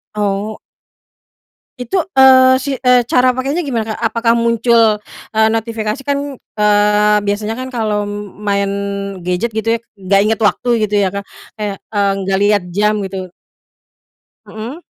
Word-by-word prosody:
Oh. 205 +1 -2 1.2
Itu, 250 +10 -2 0.2
eee, 260 -1 +7
si 275 0 -3
eh 250 0 +6
cara 250 0 +3
pakainya 275 +7 -2
gimana 225 -5 -2
Kak? - - -12
Apakah 230 0 +2
muncul, 230 -2 +3 0.3
eee, 220 0 +4
notifikasi? 225 +1 -2
Kan, 280 -1 -2 0.2
eee, 210 0 +3
biasanya 210 +3 -2
kan 260 0 -6
kalo 210 -3 -1 0.4
main 200 0 +1 0.6
gadget 180 +6 -1
gitu 220 - -2
ya 230 - -1 0.2
nggak 195 +1 +2
ingat 215 +1 0
waktu 245 +4 0 0.2
gitu 210 - -8
ya 190 - +1
Kak, 200 +1 -6 0.3
kayak, 205 -2 -3
eee, 200 -2 +1
nggak 190 0 0
liat 205 -2 +2
jam 210 +4 +1
gitu. 190 -1 -5 1.2
Mhm. 240 +10 -8
220 Hz, 140 wpm, -16 LUFS, 205-245 Hz, 1.2 s, eee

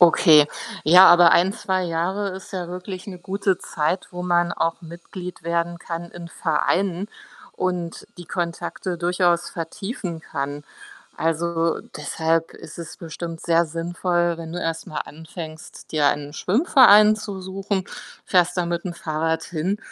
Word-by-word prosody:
Okay. 160 -3 +7 0.4
Ja, 180 +4 +9
aber 175 -1 +8
1, 185 +3 +4
2 190 -2 -1
Jahre 180 +4 -1
ist 190 +1 -9
ja 180 -2 -4
wirklich 185 +1 -7
'ne 185 -2 -8
gute 190 +1 -1
Zeit, 160 +3 -2
wo 180 0 -6
man 175 -1 +2
auch 165 0 -1
Mitglied 175 +1 -9
werden 170 0 -1
kann 170 0 -6
in 170 -1 -9
Vereinen 180 +4 0 0.4
und 180 -2 -3
die 175 - -8
Kontakte 175 +1 -4
durchaus 175 0 +1
vertiefen 170 0 -5
kann. 145 -1 -5 0.5
Also, 165 0 0 0.2
deshalb 160 +2 -1
ist 155 - -11
es 170 -1 -8
bestimmt 165 0 -7
sehr 170 0 +3
sinnvoll, 175 +1 -1
wenn 165 -1 -7
du 175 - -4
erst 165 0 -3
mal 155 - -4
anfängst, 160 0 -10
dir 150 -2 +2
einen 145 0 -2
Schwimmverein 215 - +6
zu 205 -3 -6
suchen, 195 +1 -3 0.4
fährst 180 -1 +2
da 180 - +2
mit'm 170 +1 -3
Fahrrad 160 0 -2
hin 180 +4 -2
175 Hz, 145 wpm, -23 LUFS, 165-185 Hz, 0.5 s, Ja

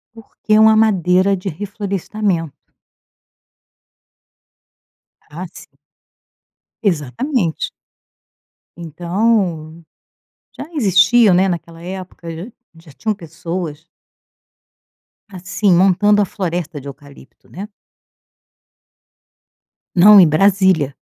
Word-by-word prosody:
Porque 225 0 -10
é 215 - +5
uma 220 0 +6
madeira 185 -1 +1
de 190 +1 -5
reflorestamento. 195 -2 -4 2.8
Ah 170 +5 -7
sim. - - -16 1.1
Exatamente. 180 - -2 1.0
Então, 170 -1 -2 0.7
já 285 - -9
existia, 210 - +4
né, 185 +2 +3
naquela 170 -2 -6
época 185 -1 -9
já 165 +8 -8 0.3
já 165 -2 -17
tinham 220 +9 -3
pessoas 165 -3 -7 1.4
assim, 190 +1 -1
montando 195 +3 +3
a - - +1
floresta 175 -5 -5
de 140 - -11
eucalipto, 140 -1 -15
né. 195 +4 -8 2.3
Não, 200 +3 +8
em 180 - +7
Brasília. 185 -3 +2
185 Hz, 85 wpm, -17 LUFS, 165-205 Hz, 2.8 s, Não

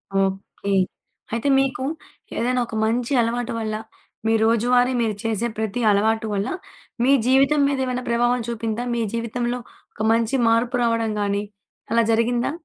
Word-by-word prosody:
Okay. 195 +1 -1 0.6
అయితే 230 +4 -1
మీకు 265 -1 0 0.5
ఏదైనా 250 +2 +1
ఒక 220 - -7
మంచి 235 +4 0
అలవాటు 235 +1 -1
వల్ల, 215 -1 -2 0.5
మీ 225 - +3
రోజువారీ 245 +3 +3
మీరు 220 -2 0
చేసే 225 +1 0
ప్రతి 220 +2 -2
అలవాటు 220 +2 +1
వల్ల 200 0 -1 0.6
మీ 265 - +4 0.2
జీవితం 275 +3 +4
మీదేమన్న 260 -2 -1
ప్రభావం 240 +1 +2
చూపిందా? 230 0 -3
మీ 235 - 0
జీవితంలో 240 +1 -2 0.3
ఒక 215 - -3
మంచి 230 +3 +1
మార్పు 230 +2 +2
రావడం 230 -1 +1
గాని, 200 0 0 0.5
అలా 230 0 +4
జరిగిందా? 235 +2 +1
230 Hz, 140 wpm, -22 LUFS, 220-245 Hz, 0.6 s, మీ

